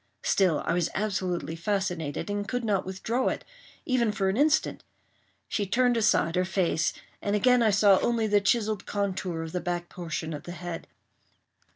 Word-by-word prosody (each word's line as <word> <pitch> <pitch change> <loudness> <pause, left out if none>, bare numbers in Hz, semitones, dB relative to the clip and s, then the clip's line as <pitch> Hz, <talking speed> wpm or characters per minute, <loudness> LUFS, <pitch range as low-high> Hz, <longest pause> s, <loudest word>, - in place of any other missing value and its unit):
Still, 185 -6 +2
I - - +1
was 175 -1 +1
absolutely 185 -5 -2
fascinated, 175 -4 -2
and 205 0 -2
could 245 -1 -2
not 195 -4 0
withdraw 225 +7 -1
it, - - -2 0.4
even 240 -4 +2
for 200 -2 0
an 190 - 0
instant. 300 +5 +2 0.6
She 205 -2 -1
turned 245 +4 +3
aside 210 -7 +2
her 180 - +3
face, 180 -3 +1 0.3
and 205 0 0
again 250 +3 +4
I 225 - +4
saw 200 -1 +5
only 235 -2 +1
the 205 -1 +3
chiselled 215 0 0
contour 190 -4 -2
of 160 - -6
the 180 - -2
back 175 0 -3
portion 165 -2 -4
of 145 - -5
the 175 - -6
head. 175 -1 -6
195 Hz, 175 wpm, -27 LUFS, 175-215 Hz, 0.6 s, saw